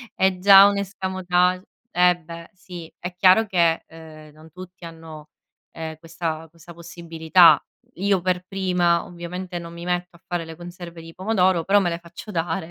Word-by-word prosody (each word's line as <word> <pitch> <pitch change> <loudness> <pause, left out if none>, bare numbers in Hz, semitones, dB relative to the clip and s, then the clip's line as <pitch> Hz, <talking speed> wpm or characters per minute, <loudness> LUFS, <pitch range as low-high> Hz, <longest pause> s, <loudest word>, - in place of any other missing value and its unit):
è 190 -1 +1
già 195 +1 +8
un'escamotage 185 -2 0 0.3
eh 180 0 +4
beh, 170 0 -11
sì, 180 -3 -11
è 180 +1 -6
chiaro 185 +4 +5
che, 170 -3 +1
ehm, 155 -2 -14
non 155 +1 -17
tutti 185 +1 -12
hanno, 160 -2 -11 0.4
ehm, 160 -1 -7
questa 165 -1 -5
questa 170 +1 -15
possibilità, 170 0 +3 0.3
io 195 -1 0
per 180 0 -1
prima 180 -3 +1
ovviamente 175 +1 -7
non 170 0 -10
mi 170 - -9
metto 180 0 -3
a 170 - -20
fare 175 -3 -4
le 160 0 -10
conserve 175 0 -10
di 165 0 -12
pomodoro, 185 -3 +1
però 200 +2 +4
me 175 - 0
le 170 - -3
faccio 170 +5 -11
dare 165 0 -3
175 Hz, 165 wpm, -22 LUFS, 165-185 Hz, 0.4 s, già